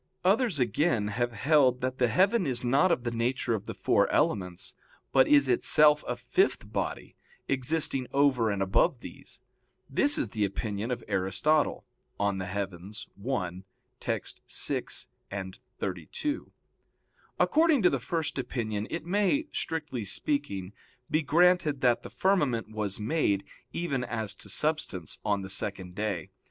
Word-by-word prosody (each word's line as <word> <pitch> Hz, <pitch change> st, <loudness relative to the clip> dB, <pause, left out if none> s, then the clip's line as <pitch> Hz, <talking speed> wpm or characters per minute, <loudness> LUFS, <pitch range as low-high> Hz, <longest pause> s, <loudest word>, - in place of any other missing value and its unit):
Others, 205 Hz, -, +3 dB
again, 120 Hz, -, +1 dB
have 120 Hz, +3 st, -1 dB
held 130 Hz, +1 st, +3 dB
that 130 Hz, +1 st, -2 dB
the 125 Hz, -, +4 dB
heaven 185 Hz, -, +3 dB
is 125 Hz, -2 st, 0 dB
not 140 Hz, +9 st, +3 dB
of 125 Hz, -, +1 dB
the 120 Hz, -, -2 dB
nature 120 Hz, +1 st, 0 dB
of 110 Hz, -, -4 dB
the -, -, -5 dB
four -, -, +2 dB
elements, 90 Hz, -2 st, 0 dB, 0.4 s
but 135 Hz, -1 st, +5 dB
is 140 Hz, -2 st, +5 dB
itself 150 Hz, +4 st, +5 dB
a 125 Hz, -, -1 dB
fifth 370 Hz, -, 0 dB
body, -, -, -3 dB, 0.3 s
existing 135 Hz, -1 st, 0 dB
over 135 Hz, -5 st, +3 dB
and 100 Hz, -1 st, 0 dB
above 95 Hz, 0 st, +2 dB
these. -, -, -10 dB, 0.5 s
This 145 Hz, +1 st, +2 dB
is 110 Hz, -, -1 dB
the 105 Hz, 0 st, -1 dB
opinion 100 Hz, +2 st, -2 dB
of 120 Hz, -2 st, -3 dB
Aristotle 95 Hz, +12 st, +1 dB, 0.3 s
(De 100 Hz, -1 st, +1 dB
Coel. 100 Hz, -1 st, -4 dB, 0.4 s
i, 100 Hz, -10 st, 0 dB, 0.5 s
text. -, -, -4 dB
6,32). 95 Hz, -, -4 dB, 0.9 s
According 315 Hz, -, +4 dB
to 180 Hz, -, +5 dB
the 135 Hz, -, 0 dB
first 160 Hz, +3 st, -2 dB
opinion, 110 Hz, -5 st, -3 dB
it 165 Hz, -, -4 dB
may, 205 Hz, -, +1 dB
strictly 150 Hz, -7 st, -3 dB
speaking, 100 Hz, -3 st, -2 dB, 0.4 s
be 155 Hz, -, +3 dB
granted 160 Hz, -2 st, +3 dB
that 120 Hz, -2 st, +3 dB
the -, -, -9 dB
firmament 140 Hz, -, +1 dB
was 105 Hz, -2 st, -3 dB
made, 105 Hz, -4 st, +1 dB, 0.3 s
even 140 Hz, -7 st, -2 dB
as 110 Hz, -5 st, -3 dB
to -, -, -9 dB
substance, 150 Hz, -, -1 dB
on 100 Hz, -1 st, 0 dB
the 95 Hz, -, -7 dB
second 95 Hz, -2 st, -2 dB
day. 100 Hz, -5 st, -3 dB
125 Hz, 140 wpm, -28 LUFS, 100-150 Hz, 0.9 s, but